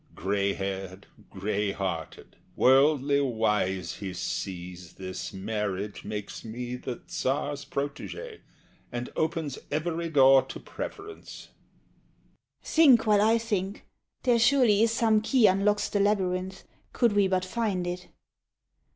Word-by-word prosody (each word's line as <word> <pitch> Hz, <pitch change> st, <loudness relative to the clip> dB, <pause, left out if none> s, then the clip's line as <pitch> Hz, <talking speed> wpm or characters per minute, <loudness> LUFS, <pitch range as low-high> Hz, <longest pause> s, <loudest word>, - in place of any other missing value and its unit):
Gray 100 Hz, +1 st, 0 dB
haired, 95 Hz, 0 st, -5 dB, 0.2 s
gray 100 Hz, +1 st, -2 dB
hearted, 90 Hz, -5 st, -5 dB, 0.2 s
worldly 140 Hz, +1 st, +4 dB
wise, 105 Hz, -7 st, 0 dB
he 95 Hz, -3 st, -6 dB
sees 90 Hz, -1 st, -5 dB
This 95 Hz, -1 st, -6 dB
marriage 100 Hz, 0 st, -4 dB
makes 105 Hz, -1 st, -6 dB
me 120 Hz, +2 st, -5 dB
the 125 Hz, -1 st, -6 dB
Tsar's 145 Hz, +2 st, -2 dB
protege, 150 Hz, -, -5 dB, 0.5 s
And 120 Hz, 0 st, -5 dB
opens 160 Hz, -3 st, -2 dB
every 165 Hz, +2 st, -2 dB
door 135 Hz, -3 st, +6 dB
to -, -, -9 dB
preference. 410 Hz, 0 st, -8 dB, 1.1 s
SHE. -, -, -26 dB
Think 275 Hz, -9 st, +6 dB
while 210 Hz, -2 st, +4 dB
I 220 Hz, +2 st, +4 dB
think. 205 Hz, -4 st, -3 dB, 0.4 s
There 245 Hz, -2 st, +3 dB
surely 235 Hz, -4 st, +4 dB
is 225 Hz, 0 st, +4 dB
some 225 Hz, -2 st, +3 dB
key 240 Hz, +1 st, +3 dB
Unlocks 205 Hz, +2 st, +3 dB
the 205 Hz, -, -1 dB
labyrinth, 190 Hz, -2 st, 0 dB, 0.3 s
could 235 Hz, -3 st, +2 dB
we 205 Hz, -1 st, +3 dB
but 185 Hz, -1 st, 0 dB
find 195 Hz, -3 st, -1 dB
it. 180 Hz, +1 st, -5 dB
145 Hz, 125 wpm, -27 LUFS, -, 1.1 s, door